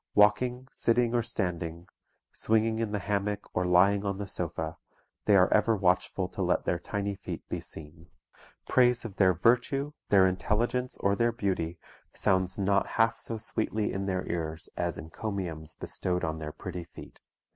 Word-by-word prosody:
Walking, 125 +5 +3
sitting, 120 0 +2
or 120 - +3
standing, 85 -5 -3 0.5
swinging 110 0 +1
in 115 -2 -1
the 105 - 0
hammock 105 0 -1
or 90 0 0
lying 100 +3 +4
on 100 -1 -2
the 100 0 -5
sofa, 85 -2 -2 0.5
they 105 - +5
are 90 -1 +5
ever 110 +1 +4
watchful 90 -1 +1
to 100 - -5
let 90 -1 +1
their 85 - 0
tiny 100 +2 -3
feet 95 - -7
be - - -2
seen. 80 +2 -11 0.6
Praise 125 -2 +3
of 100 -4 -7
their 95 -2 +4
virtue, 130 - +2 0.2
their 95 -2 +6
intelligence, 115 +7 0
or 100 0 +2
their 115 +3 +2
beauty, 95 -7 -2 0.4
sounds 95 -1 +1
not 100 0 +2
half 115 0 +3
so 115 - -3
sweetly 110 -1 -1
in 95 0 -2
their 95 -1 -2
ears 80 -1 -3
as 85 -2 -2
encomiums 80 -1 -5
bestowed 90 -1 -2
on 80 0 -2
their 75 -1 -5
pretty 90 +1 -7
feet. 85 - -13
100 Hz, 165 wpm, -29 LUFS, 90-110 Hz, 0.6 s, their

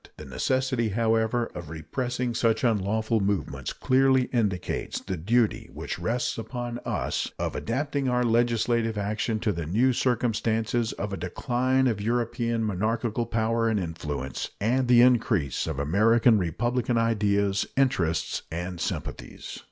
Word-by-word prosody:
The 75 - -9
necessity, 125 - 0
however, 115 +2 +1
of 85 -4 -7
repressing 120 - -3
such 115 +1 +1
unlawful 110 0 +1
movements 100 -1 -2
clearly 130 0 +3
indicates 105 -7 -1
the 95 - -4
duty 110 +7 +1
which - - -5
rests 120 0 -1
upon 120 +1 -5
us - - -2
of - - -3
adapting 140 +2 -1
our 125 0 +2
legislative 115 -1 +1
action 105 +2 -1
to 110 - +1
the 85 -4 -4
new 120 +9 +3
circumstances 115 -1 0
of 100 0 -4
a - - -3
decline 125 +9 0
of 110 -5 0
European 115 +1 0
monarchical 110 +3 -1
power 115 0 +1
and 110 -2 +1
influence 75 -6 -4
and 125 +5 +1
the 120 -1 +7
increase 115 - +2
of 80 -3 -3
American 110 - +4
republican 120 +8 0
ideas, 100 -3 +1
interests, 95 -12 +1
and 85 +1 -4
sympathies. - - -5
115 Hz, 135 wpm, -26 LUFS, 100-120 Hz, -, the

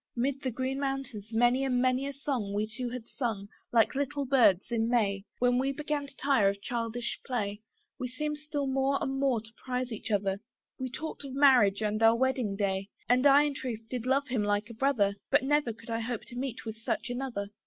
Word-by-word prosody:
'Mid 270 +3 0
the 260 - -1
green 260 +3 -2
mountains 270 -6 -3
many 240 +3 +3
and 255 -2 +1
many 255 +2 +2
a 280 - -4
song 255 -8 -2
We 210 +1 +1
two 235 +3 -5
had 240 -2 -7
sung, 220 -7 -3 0.2
like 230 -2 +4
little 285 +1 -1
birds 240 -7 +4
in 225 -1 +1
May. 200 -5 +1
When 245 0 +3
we 270 +1 +1
began 290 0 -2
to 275 - -16
tire 265 -8 +3
of 200 0 -3
childish 235 +2 -3
play 210 -5 -2 0.4
We 250 - -2
seemed 300 +4 -3
still 295 -1 -3
more 270 +1 +1
and 270 0 -2
more 265 -5 +2
to 220 +1 -15
prize 250 -1 -2
each 220 - -5
other: 200 -2 0 0.4
We 260 0 -3
talked 305 +4 -6
of 270 -1 -7
marriage 245 -8 +5
and 215 +1 0
our 225 +1 +6
marriage 255 -6 0
day; 195 -1 -1 0.2
And 255 +3 +5
I 280 +1 +7
in 295 -1 0
truth 245 -5 -4
did 250 -1 -3
love 275 +2 +2
him 245 -4 0
like 205 +2 0
a - - -8
brother, 220 -5 +2
For 285 - +6
never 290 -2 +2
could 225 +1 -10
I 225 - 0
hope 230 0 -3
to 245 - -10
meet 250 -2 -4
with 220 -1 -5
such 225 +2 -2
another. 245 -5 -3
245 Hz, 215 wpm, -30 LUFS, 220-270 Hz, 0.4 s, I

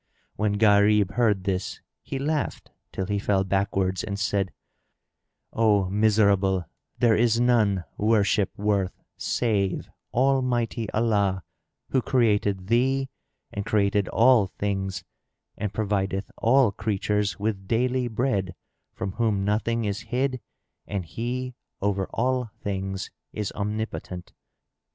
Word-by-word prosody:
When 105 -1 0
Gharib 105 -2 +4
heard 110 -6 +2
this, 95 -1 -2 0.2
he 135 - -5
laughed 145 +1 -2 0.2
till 95 - -3
he 100 +1 -1
fell 100 -1 +1
backwards 95 -1 0
and 100 -1 -3
said, 100 -2 0 1.0
"O 105 -4 +3
miserable, 100 -3 +3 0.3
there 115 -2 +4
is 115 0 +3
none 110 -6 +3 0.2
worship 105 -2 +3
worth 100 -2 0 0.2
save 100 -6 -1 0.2
Almighty 125 -4 +1
Allah, 100 -5 +1 0.5
who 130 - +3
created 105 -7 +1
thee 130 +5 +2 0.4
and 100 - -3
created 100 -1 +1
all 115 -4 +5
things 95 0 -3 0.5
and 105 -2 -3
provideth 100 -1 -1
all 125 -1 +4
creatures 105 0 -1
with 100 -2 -2
daily 125 +2 +1
bread, 110 -6 -1 0.4
from 95 0 -3
whom 105 -2 0
nothing 115 +2 0
is 100 0 -1
hid 130 0 0 0.5
and 100 -3 -3
He 125 +7 -4 0.3
over 95 -1 0
all 125 0 0
things 95 -1 -3 0.2
is 105 -2 -3
Omnipotent." 105 -3 -4
105 Hz, 115 wpm, -25 LUFS, 95-115 Hz, 1.0 s, all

